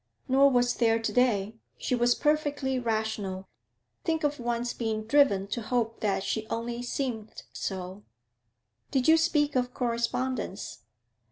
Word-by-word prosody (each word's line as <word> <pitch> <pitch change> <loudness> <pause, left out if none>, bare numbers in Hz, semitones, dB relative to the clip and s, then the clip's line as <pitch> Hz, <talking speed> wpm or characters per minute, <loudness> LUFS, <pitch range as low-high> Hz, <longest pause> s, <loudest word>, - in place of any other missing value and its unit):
'Nor 275 +1 +5
was 245 -2 +2
there 225 -2 +3
to 225 - -2
day. 225 -4 +2 0.2
She - - -2
was 245 0 +3
perfectly 290 -3 0
rational. 220 -5 -2 0.6
Think 320 -2 0
of 290 -1 0
one's 240 0 -1
being 220 -2 -2
driven 225 -6 +3
to 235 - -2
hope 230 0 -1
that 200 -2 0
she 220 +1 -2
only 235 +1 -3
seemed 245 -3 -4
so!' 190 0 -5 0.9
'Did 260 -2 +1
you 320 - +8
speak 300 -3 +2
of 250 -1 0
correspondence?' 235 -2 -2
240 Hz, 140 wpm, -28 LUFS, 220-265 Hz, 0.9 s, you